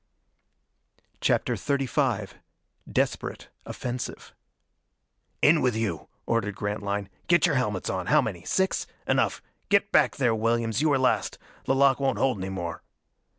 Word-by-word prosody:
CHAPTER - - +1
XXXV 135 -6 0 0.6
Desperate - - -1 0.2
Offensive 125 0 -5 1.1
"In 155 +1 +6
with 125 -3 +2
you!" 105 -9 -2 0.2
ordered 115 -3 0
Grantline. 100 -1 -3 0.2
"Get 175 0 +5
your 170 - +2
helmets 105 -8 -1
on! 95 -1 -2
How - - +5
many? 90 -6 -3
Six? 190 0 0 0.2
Enough - - +1 0.3
get 200 0 +3
back 145 -5 +4
there, 125 -4 +2
Williams 115 +1 0
you 155 - +3
were 140 - +3
last. 130 -1 +1 0.3
The 135 - +2
lock 135 0 +4
won't 135 -1 +1
hold 130 -6 +1
any 95 +1 -4
more." 85 -4 -5
120 Hz, 135 wpm, -26 LUFS, 100-140 Hz, 1.1 s, In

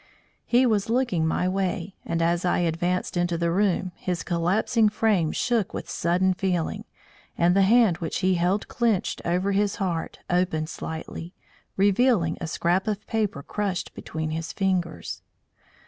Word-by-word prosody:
He 250 +2 +4
was 215 -3 +1
looking 230 -10 +1
my 180 +3 0
way, 190 0 -2
and 165 0 0
as 170 +1 +1
I 180 - +2
advanced 175 +2 -1
into 175 -1 0
the 170 0 0
room, 185 0 +1
his 180 -2 -3
collapsing 200 +6 +2
frame 210 -7 +1
shook 235 -6 0
with - - -5
sudden 180 +2 +1
feeling, 180 -3 -2 0.5
and 175 +2 +3
the 195 - +5
hand 210 -3 +5
which 165 -3 -3
he 185 0 +3
held 180 +4 +1
clenched 230 -6 0
over 180 +3 +1
his 200 +1 +1
heart 180 -6 -3
opened 175 -3 0
slightly, 165 +2 -6 0.4
revealing 200 -3 +3
a 165 - -3
scrap 175 +4 0
of 215 0 -2
paper 210 -10 -1
crushed 200 0 -3
between 160 0 -5
his 165 +1 -3
fingers. 185 -4 -2
185 Hz, 150 wpm, -25 LUFS, 170-205 Hz, 0.5 s, the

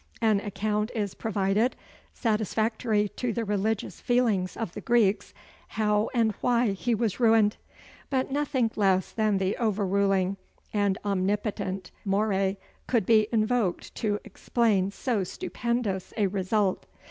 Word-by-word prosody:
An 220 -3 +3
account 210 +1 -1
is 205 -4 -1
provided, 210 +2 0 0.4
satisfactory 220 0 0
to 245 +3 -3
the 230 0 -2
religious 210 +1 -1
feelings 225 -7 +1
of 220 -7 -4
the - - -6
Greeks, 210 -5 +2 0.4
how 210 0 +1
and 230 -3 +2
why 240 -3 +2
he 230 +5 0
was 220 -1 -1
ruined 225 -3 +4 0.5
but 265 -1 0
nothing 265 -5 0
less 190 -3 +2
than 215 -3 +1
the 190 +1 0
overruling 195 -3 +1 0.4
and 200 -2 +1
omnipotent 195 -1 -1
Moeræ 195 -1 +1 0.3
could 230 -6 +2
be 215 -1 +4
invoked 220 -4 0
to 210 -2 -1
explain 215 -2 +1
so 210 0 -1
stupendous 220 0 -3
a 210 - +3
result. 195 +1 0
210 Hz, 125 wpm, -27 LUFS, 195-225 Hz, 0.5 s, ruined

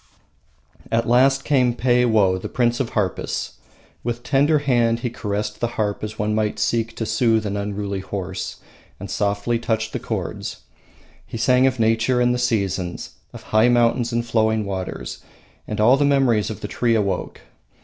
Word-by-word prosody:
At 115 0 +1
last 135 +3 +4
came 125 -5 +2
Peiwoh, 115 -7 +2
the - - -5
prince 120 -1 +1
of 130 -4 -1
harpists. 95 -4 -2 0.4
With 120 0 -3
tender 145 +4 +3
hand 120 -5 +1
he 120 - -2
caressed 105 -1 -3
the 120 - 0
harp 105 -1 -1
as 110 0 -5
one 105 +1 -1
might 105 -1 0
seek 115 +1 0
to 115 - -3
soothe 110 -1 +2
an 100 -1 -2
unruly 100 -1 -3
horse, 95 -1 -5 0.4
and - - -7
softly 105 +3 0
touched 110 -1 -2
the - - -2
chords. - - -5 0.7
He - - -6
sang 125 +3 +4
of 130 -2 -1
nature 115 +3 +2
and 125 0 +3
the 125 - -1
seasons, 100 -7 -1 0.2
of - - -11
high 110 +3 +3
mountains 120 0 +2
and 120 0 -1
flowing 110 -2 +1
waters, 95 -2 -5 0.5
and 105 - -4
all 120 +5 +5
the 145 - +2
memories 135 -7 +2
of 110 - -7
the - - -4
tree 115 +2 +1
awoke! 100 -3 -2
115 Hz, 170 wpm, -22 LUFS, 105-120 Hz, 0.7 s, all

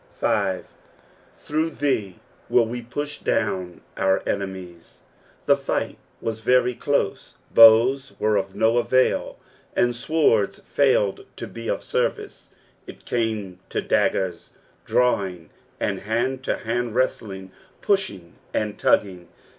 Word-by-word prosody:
fl. - - 0 0.4
" - - -31
Through 155 +1 0
thee 130 - -1 0.3
vill 115 -1 +3
tee 125 - -4
puth 145 +5 -6
doien 95 -5 -1
our 95 0 +1
«n«miM." 95 -3 -4 0.6
The - - +5
fight - - -3 0.2
was 110 -1 -4
very 125 +2 +3
close, 120 -4 -2 0.2
bows 120 +5 +7
were 110 0 +1
of 95 -1 -2
no 115 +2 +3
avul, 130 +2 +1 0.4
and 120 0 +2
swords 125 -5 +1
failed 130 -8 +1
to - - -6
be 115 0 -8
of - - -2
service, - - -2 0.4
it - - -12
came 110 -6 -2
to - - -1
daggers 90 -3 0 0.3
drawing, 95 -9 0 0.3
and 100 -2 -1
hand 120 +5 -1
to - - -1
band 120 0 -2
wrestling, 95 -7 -2 0.3
pushing 100 - -1 0.2
and 105 -1 -2
tugging. 90 -3 +1
115 Hz, 125 wpm, -23 LUFS, 95-125 Hz, 0.6 s, bows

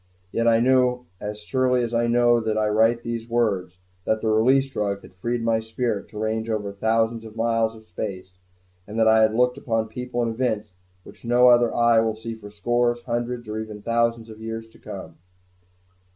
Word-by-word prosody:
Yet 115 0 0
I 115 -1 +5
know 125 0 +2
as 105 0 -6
surely 125 +1 +1
as 120 0 -3
I 120 0 +2
know 120 0 +4
that 110 -1 -1
I 110 0 +2
write 115 +2 +3
these 115 0 -4
words 100 -7 0 0.3
that 110 +3 0
the 110 - -1
Release 130 +5 +4
Drug 100 -6 -2
had - - -14
freed 120 +5 -3
my 115 -1 +2
spirit 110 -1 -3
to 105 - -12
range 110 +1 -2
over 105 -2 -2
thousands 115 +2 0
of 110 -1 -11
miles 115 0 +1
of 110 - -14
space, 95 -2 -7 0.5
and 105 +2 -7
that 110 0 +4
I 110 0 +6
have 110 0 +3
looked 125 +2 +2
on 115 -1 +1
people 125 +1 -3
and 115 -1 -1
events 110 -5 -2 0.3
which - - -15
no 120 +1 +5
other 120 -1 +5
eye 120 -1 +4
will 110 -1 +1
view 115 +1 -6
for 105 -2 -11
scores, 120 +3 0
hundreds 120 0 -3
or 105 +1 -4
even 105 -1 -7
thousands 115 -1 0
of 110 0 -12
years 115 0 -5
to - - -20
come. - - -9
115 Hz, 200 wpm, -24 LUFS, 110-120 Hz, 0.5 s, I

